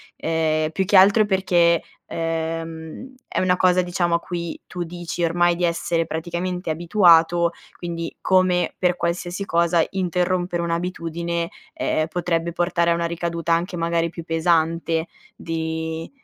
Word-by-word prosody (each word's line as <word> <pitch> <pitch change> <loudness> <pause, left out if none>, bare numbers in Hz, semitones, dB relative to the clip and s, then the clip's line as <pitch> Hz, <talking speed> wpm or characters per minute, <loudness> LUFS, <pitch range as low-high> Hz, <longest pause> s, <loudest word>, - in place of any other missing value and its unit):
ehm, 155 -1 0
più 190 +4 -1
che 205 - +1
altro 200 +3 +7
perché, 175 -4 +3 0.2
ehm, 165 +6 -4
è - - -2
una 180 -1 +2
cosa, 185 0 +4
diciamo, 175 -1 0
a - - +1
cui 170 -2 -5
tu 180 -1 -4
dici 175 0 -6
ormai 175 +1 +2
di 175 - 0
essere 170 0 0
praticamente 175 +2 -4
abituato, 170 0 +4 0.3
quindi 170 -1 -5
come 185 -2 +2
per 180 -1 +1
qualsiasi 175 +3 -2
cosa 170 -2 +2
interrompere 180 -1 -1
un'abitudine, 170 0 -2 0.2
ehm, 155 0 0
potrebbe 170 0 -1
portare 170 0 +1
a - - +5
una 170 0 -1
ricaduta 170 0 -2
anche 170 +2 +1
magari 170 0 0
più 170 0 -8
pesante 165 0 +1 0.3
di 160 0 -4
170 Hz, 135 wpm, -22 LUFS, 165-180 Hz, 0.3 s, altro